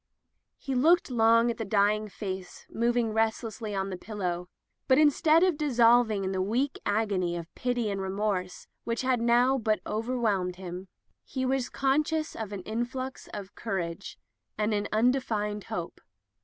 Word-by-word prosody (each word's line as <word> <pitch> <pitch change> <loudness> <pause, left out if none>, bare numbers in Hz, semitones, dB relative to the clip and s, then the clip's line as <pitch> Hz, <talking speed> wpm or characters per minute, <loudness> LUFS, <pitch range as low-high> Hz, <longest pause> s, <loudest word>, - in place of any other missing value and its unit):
He 270 - -4
looked 315 +4 +4
long 230 0 +4
at 230 - -7
the 225 - -3
dying 210 +1 +2
face 190 -2 -6
moving 235 -1 +1
restlessly 220 -1 -1
on 195 0 -2
the 185 - -4
pillow, 180 -4 -4 0.4
but 260 - +5
instead 310 +2 +5
of 365 -5 +2
dissolving 235 -6 +4
in 190 - -1
the 190 -1 -1
weak 245 +8 -1
agony 200 -5 0
of 170 0 -8
pity 245 -2 -1
and 195 -1 -3
remorse 190 -1 -2 0.2
which 230 +2 -2
had 255 -1 +2
but - - -2
now 245 +2 +4 0.2
overwhelmed 215 -6 -1
him, 180 0 -7 0.4
he 260 -1 -3
was 260 -1 0
conscious 305 +3 0
of 220 -3 -5
an 195 -3 -6
influx 245 +5 -4
of 200 -1 -7
cour 220 -4 -3
age 170 +1 -5 0.4
and 210 +1 +1
of 205 - +2
an 205 - -3
undefined 215 -3 0
hope. 170 -1 -5
220 Hz, 160 wpm, -28 LUFS, 195-250 Hz, 0.4 s, but